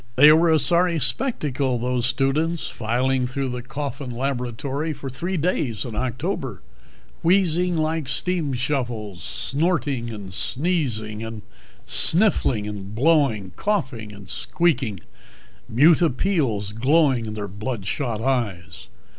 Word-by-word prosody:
They 145 +4 +8
were 165 +2 +5
a 160 - +5
sorry 170 +4 +2
spectacle, 140 - 0
those 125 0 0
students 140 +6 0
filing 125 +3 0
through 135 +1 -2
the 125 0 -4
Coffin 140 +1 -5
laboratory 135 +4 -2
for 135 -2 -7
three 175 +8 -3
days 145 -8 -1
in 115 -3 -6
October: 125 +1 -3 0.6
wheezing 175 -1 +2
like 155 -2 -1
steam 155 +2 +1
shovels, 120 - -3
snorting 145 -5 -1
and 100 -4 -7
sneezing 120 - 0
and 110 -2 -7 0.4
sniffling 155 - +2
and 105 -1 -6
blowing, 130 - +2
coughing 130 - -2
and 100 -2 -12
squeaking, 130 - 0 0.7
mute 150 +9 +5
appeals 130 - 0
glowing 130 +1 +2
in 110 - -5
their 105 -1 -4
blood 105 +2 -5
shot 115 -1 -2
eyes. 115 -9 -2
130 Hz, 120 wpm, -23 LUFS, 115-155 Hz, 0.7 s, They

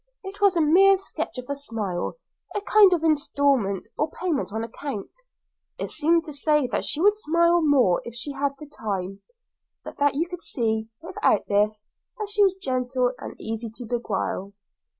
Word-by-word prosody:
It 390 +1 -9
was 395 -3 +4
a - - +4
mere 385 +6 +6
sketch 375 - -3
of 250 - -6
a 280 - -2
smile, 225 - -4 0.4
a 415 - 0
kind 410 -1 +6
of 340 -3 +1
instalment, 280 - +1
or 300 - +1
payment 320 - -2
on 220 +2 -3
account; 230 -1 -6 0.7
it - - -4
seemed 330 +2 +2
to 300 - -6
say 300 0 +2
that - - 0
she 300 - -1
would 410 +4 +5
smile 340 -3 +2
more 265 - +3
if 235 - -9
she 240 +4 -5
had 280 0 -1 0.2
time, 195 -2 -4 0.6
but - - -9
that 285 -1 +3
you 330 +4 0
could 355 -1 -8
see, 220 -6 -1 0.2
without 380 +4 +1
this, 210 +1 +1 0.3
that 425 -2 -4
she 410 - +1
was 385 -2 +4
gentle 255 -6 -1
and - - -9
easy 225 +1 -4
to 245 - -8
beguile. 205 -4 -3
285 Hz, 175 wpm, -25 LUFS, 225-340 Hz, 0.7 s, mere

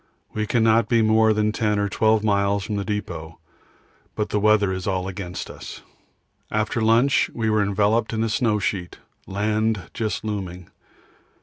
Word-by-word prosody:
We 105 0 -2
cannot 115 -1 +3
be 115 -2 +3
more 110 0 +4
than 105 0 +1
10 105 -1 0
or 100 0 +1
12 110 +1 +2
miles 100 -1 +1
from 105 +1 -3
the 100 - -2
depot, 85 -6 -5 0.8
but 105 - -2
the 105 - 0
weather 105 -2 +3
is 95 -1 -5
all 95 -1 -1
against 95 -2 -6
us. - - -10 0.7
After 110 +3 -1
lunch 115 +5 +3
we 110 -2 0
were 110 -1 +3
enveloped 105 +3 +1
in 110 0 -1
a 115 - 0
snow 110 -1 +1
sheet, 95 -3 -3 0.3
land 105 -3 -1
just 110 -2 -3
looming. 90 -4 -5
105 Hz, 165 wpm, -23 LUFS, 100-110 Hz, 0.8 s, more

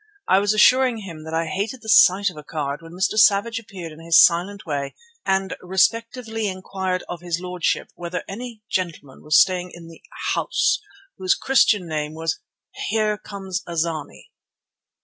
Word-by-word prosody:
I 190 - +5
was 205 +1 +1
assuring 250 +3 +5
him 165 -5 -9
that 160 - -7
I 165 +1 0
hated 205 +9 -4
the - - -11
sight 200 -2 +5
of - - -16
a 150 - -10
card 145 -1 -4
when 165 0 -12
Mr. 190 +4 0
Savage 215 +3 +4
appeared 190 -7 -9
in 155 +1 -13
his 165 -1 +6
silent 185 +4 +3
way 140 -3 -3 0.3
and 190 -1 0
respectfully 225 +4 0
inquired 185 -1 -3
of 175 -1 -6
his 175 -1 -2
lordship 180 -1 -2
whether 175 +1 -5
any 225 +1 -8
gentleman 170 -9 -4
was 155 +1 +4
staying 180 -1 +2
in 170 -1 -11
the 165 - -14 0.3
house - - +1 0.4
whose 185 -1 +2
Christian 215 -8 +3
name 155 -1 -3
was 160 0 -2 0.5
Here 215 0 +1
come 200 -2 -10 0.2
a 170 -1 -6
zany. 160 -3 -3
185 Hz, 170 wpm, -22 LUFS, 165-210 Hz, 0.5 s, his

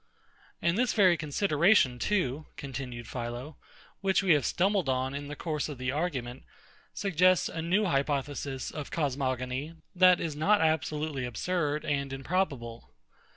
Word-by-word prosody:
And 170 +5 +2
this 250 -2 +2
very 185 -5 +5
consideration 155 - +2
too, 155 -7 -1
continued 125 -3 -6
PHILO, 120 +5 -5 0.4
which 195 0 +2
we 185 -4 +5
have 145 -4 +2
stumbled 190 -4 +1
on 130 +1 0
in 145 0 -5
the 145 - -6
course 155 -1 -3
of 145 - -6
the 130 0 -2
argument, 135 -5 -3 0.5
suggests 185 -1 +3
a 165 - -5
new 185 +6 +2
hypothesis 140 -3 -1
of 150 -2 -6
cosmogony, 135 0 -2 0.2
that 185 -1 +6
is 160 -3 -3
not 200 +8 +3
absolutely 155 -3 0
absurd 150 +5 -1
and 140 -2 -1
improbable. 135 -5 -2
150 Hz, 140 wpm, -29 LUFS, 130-175 Hz, 0.5 s, that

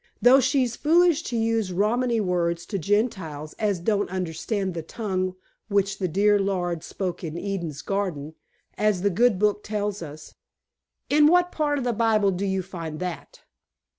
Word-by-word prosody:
"Though 255 +2 +7
she's 260 -2 +1
foolish 335 +1 +4
to 235 - -2
use 225 -3 0
Romany 230 +5 +1
words 175 -3 0
to 200 - -3
Gentiles 175 -6 -1
as 205 -4 0
don't 205 +3 0
understand 185 +2 -2
the 165 - -4
tongue 185 0 -3 0.3
which 200 -1 0
the 185 - 0
dear 205 +4 +3
Lord 175 -4 -1
spoke 185 -1 -4
in 160 0 -5
Eden's 170 -7 -4
garden, 175 -7 -3 0.5
as 210 -3 +1
the 200 - +3
good 230 +2 +3
Book 210 +1 +1
tells 205 -1 -3
us." 155 -1 -9 0.8
"In 295 +1 +6
what 355 +2 +4
part 295 -2 0
of 270 - -2
the 245 -1 0
Bible 215 -3 +2
do 190 +2 -2
you 190 -1 -1
find 165 -4 -7
that?" 180 -2 -6
200 Hz, 165 wpm, -25 LUFS, 175-225 Hz, 0.8 s, Though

